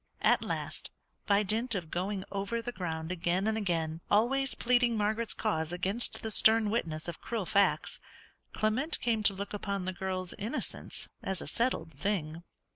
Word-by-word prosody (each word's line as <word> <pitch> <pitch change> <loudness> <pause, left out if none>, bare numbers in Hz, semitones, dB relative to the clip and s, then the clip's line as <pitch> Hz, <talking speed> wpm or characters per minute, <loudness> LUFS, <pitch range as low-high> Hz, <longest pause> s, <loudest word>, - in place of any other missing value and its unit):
At - - +4
last, - - -1 0.4
by 205 0 +4
dint 225 +4 +1
of 170 -5 -4
going 190 +2 -2
over 200 +4 -2
the 235 +1 -4
ground 165 -5 -4
again 180 +2 0
and 220 0 +1
again, 165 -6 -1
always 265 +6 +3
pleading 245 -1 +2
Margaret's 215 +2 0
cause 160 0 -1
against 195 +6 0
the 220 - -2
stern 220 -1 +5
witness 160 -9 -1
of 170 - -6
cruel 225 -5 -3
facts, 200 +2 +2 0.5
Clement 250 +9 +1
came 230 -3 +1
to 200 -2 +6
look 200 +1 -5
upon 200 -2 -3
the 185 - -2
girl's 185 -1 -3
innocence 225 +9 -3
as 190 -1 -1
a - - -2
settled 235 -9 0
thing. 160 0 -2
200 Hz, 165 wpm, -31 LUFS, 180-225 Hz, 0.5 s, to